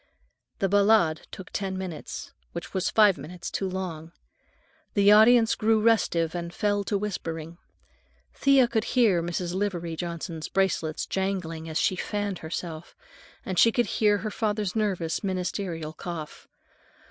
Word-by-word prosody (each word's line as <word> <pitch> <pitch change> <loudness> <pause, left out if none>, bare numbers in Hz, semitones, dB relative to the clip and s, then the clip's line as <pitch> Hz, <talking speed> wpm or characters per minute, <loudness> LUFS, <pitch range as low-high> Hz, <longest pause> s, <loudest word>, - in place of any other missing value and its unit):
The 195 - +1
"Ballade" 200 -5 +3
took 190 - -10
ten 190 -1 -3
minutes, 185 -5 -6 0.2
which - - -7
was 190 -1 0
five 205 -7 +5
minutes 170 +5 -7
too 195 - -2
long. 170 -3 -5 0.8
The 200 0 +6
audience 225 +2 +6
grew 220 0 +2
restive 190 -7 +2
and 170 -1 -4
fell 205 +2 0
to 205 - 0
whispering. 170 -5 -5 0.7
Thea 275 -3 +4
could 225 -2 0
hear 210 -8 +4
Mrs. 175 +1 -3
Livery 180 -4 -2
Johnson's 170 -1 -5
bracelets 175 -5 0
jangling 180 -4 -3
as 160 - -2
she 185 - +2
fanned 205 0 -3
herself, 160 0 -6 0.5
and 185 -2 -1
she 230 - +6
could 240 +1 +1
hear 210 -2 +2
her 215 +1 -4
father's 210 -2 -1
nervous, 190 -7 -1
ministerial 180 -4 -3
cough. 160 -2 -7
190 Hz, 140 wpm, -26 LUFS, 170-210 Hz, 0.8 s, The